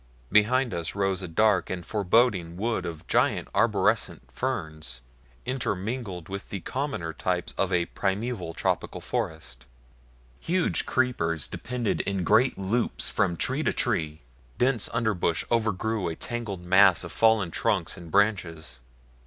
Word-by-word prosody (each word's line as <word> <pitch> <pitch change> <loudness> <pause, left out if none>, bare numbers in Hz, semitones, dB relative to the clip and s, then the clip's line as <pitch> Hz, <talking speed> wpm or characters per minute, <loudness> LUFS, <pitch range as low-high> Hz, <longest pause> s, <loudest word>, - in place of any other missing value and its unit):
Behind 120 +3 +4
us 85 0 -3
rose 95 -1 0
a 90 - -4
dark 100 +3 +2
and 90 -2 -4
forbidding 100 -4 +2
wood 110 -3 -1
of 80 -2 -7
giant - - +1
arborescent 60 - +1
ferns 75 -2 -4 0.5
intermingled 110 -6 -3
with 100 0 -6
the 100 - -4
commoner 130 - -3
types 90 +1 -1
of 95 -1 0
a 90 -1 +2
primeval 95 -3 -2
tropical - - -1
forest. 65 -6 -4 0.7
Huge 180 +1 0
creepers 85 -12 +1
depended 120 -4 -2
in 100 -2 -2
great 120 +9 +4
loops 100 +5 -1
from 85 - +1
tree 130 - +1
to - - +1
tree, 80 -10 -1 0.4
dense 125 -3 +1
under 115 -2 +1
brush 85 -3 0
overgrew 110 -3 0
a 80 - -4
tangled 105 -6 -4
mass 95 0 +6
of 85 - -7
fallen 110 -6 +3
trunks - - 0
and 85 -1 -11
branches. 85 - 0
95 Hz, 135 wpm, -27 LUFS, 85-115 Hz, 0.7 s, mass